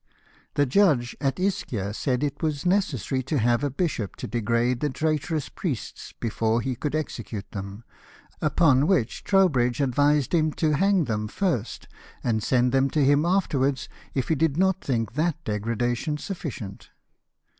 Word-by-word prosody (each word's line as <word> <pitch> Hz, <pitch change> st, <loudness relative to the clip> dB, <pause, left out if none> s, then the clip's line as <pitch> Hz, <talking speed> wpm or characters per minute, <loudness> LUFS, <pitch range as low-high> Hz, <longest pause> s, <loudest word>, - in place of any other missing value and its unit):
The 145 Hz, -, +3 dB
judge 140 Hz, -5 st, +3 dB
at 135 Hz, +3 st, 0 dB
Ischia 130 Hz, -, -1 dB
said 125 Hz, +4 st, -1 dB
it 145 Hz, -1 st, -2 dB
was 155 Hz, -2 st, -1 dB
necessary 155 Hz, -, +1 dB
to 140 Hz, +4 st, -2 dB
have 120 Hz, +2 st, +2 dB
a 145 Hz, -, +1 dB
bishop 135 Hz, -, -2 dB
to -, -, -6 dB
degrade 120 Hz, +1 st, 0 dB
the 150 Hz, -, 0 dB
traitorous 155 Hz, +1 st, -1 dB
priests 145 Hz, -, -5 dB
before 115 Hz, 0 st, 0 dB
he 125 Hz, +2 st, -2 dB
could 150 Hz, +5 st, -3 dB
execute 115 Hz, -9 st, -5 dB
them, 100 Hz, +2 st, -7 dB, 0.6 s
upon 150 Hz, -2 st, +3 dB
which 155 Hz, -, +1 dB
Trowbridge 140 Hz, -, +3 dB
advised 145 Hz, +2 st, +2 dB
him 155 Hz, -2 st, +2 dB
to 155 Hz, -2 st, +1 dB
hang 195 Hz, +2 st, +3 dB
them 105 Hz, -5 st, -2 dB
first, 125 Hz, -, -2 dB, 0.4 s
and 110 Hz, -3 st, +1 dB
send 125 Hz, +2 st, +2 dB
them 135 Hz, +1 st, +3 dB
to 150 Hz, -1 st, +2 dB
him 145 Hz, +3 st, +4 dB
afterwards, 140 Hz, -7 st, +1 dB, 0.3 s
if 130 Hz, -, -1 dB
he -, -, +4 dB
did 160 Hz, -1 st, +1 dB
not 190 Hz, 0 st, +2 dB
think 115 Hz, -4 st, -1 dB
that 155 Hz, +4 st, +1 dB
degradation 115 Hz, +7 st, -1 dB
sufficient. 145 Hz, -, -6 dB
135 Hz, 155 wpm, -25 LUFS, 120-155 Hz, 0.6 s, him